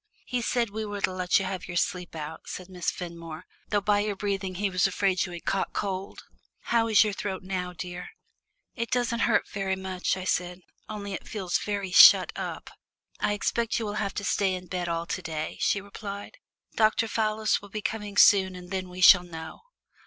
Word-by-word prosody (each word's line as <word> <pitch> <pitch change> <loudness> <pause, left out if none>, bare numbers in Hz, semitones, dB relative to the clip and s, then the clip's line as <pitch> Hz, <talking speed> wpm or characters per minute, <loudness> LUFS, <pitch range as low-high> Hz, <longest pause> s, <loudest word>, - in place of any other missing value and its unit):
"He 250 -1 -2
said 235 -2 0
we 220 +1 -3
were 205 -1 -5
to 185 - +1
let 180 -1 +2
you 195 - 0
have 185 -1 -4
your 175 -1 -4
sleep 180 -1 -1
out," 155 0 -7
said 185 0 -7
Miss 180 -2 -2
Fenmore, 170 -2 -7 0.2
"though 205 -1 +1
by 205 0 +2
your 205 0 -1
breathing 195 -2 -2
he 200 +3 0
was 185 -1 +2
afraid 190 -1 +1
you - - -9
had 175 -1 -8
caught 195 - -1
cold. 195 -1 -4 0.4
How 230 -1 +1
is 220 -1 +6
your 210 -1 -1
throat 190 -2 -4
now, 185 -1 -3
dear?" 180 0 -7 0.6
"It 230 -1 -3
doesn't 240 -1 0
hurt - - +2
very 195 -1 -2
much," 190 -1 -2
I 185 - -5
said, 180 -1 -1 0.3
"only 205 -2 -5
it - - -6
feels 190 -5 -1
very 200 -3 -3
shut - - +9
up." - - -5 0.5
"I 205 - +1
expect 230 +2 0
you 225 - -2
will 205 - -3
have 200 -1 -3
to 205 - -3
stay 195 -1 +1
in 180 0 -7
bed 175 0 -3
all 165 0 -1
to - - -3
day," 155 -1 -4
she 200 - +2
replied. 200 - -8 0.4
"Dr. 220 +1 +3
Fallis 215 0 0
will 205 - -12
be 215 +1 -5
coming 210 -2 -4
soon 190 -2 +6
and 180 0 -10
then 185 -1 -3
we 180 +1 -8
shall 185 -1 +9
know." 160 -2 -8
195 Hz, 205 wpm, -27 LUFS, 180-210 Hz, 0.6 s, shut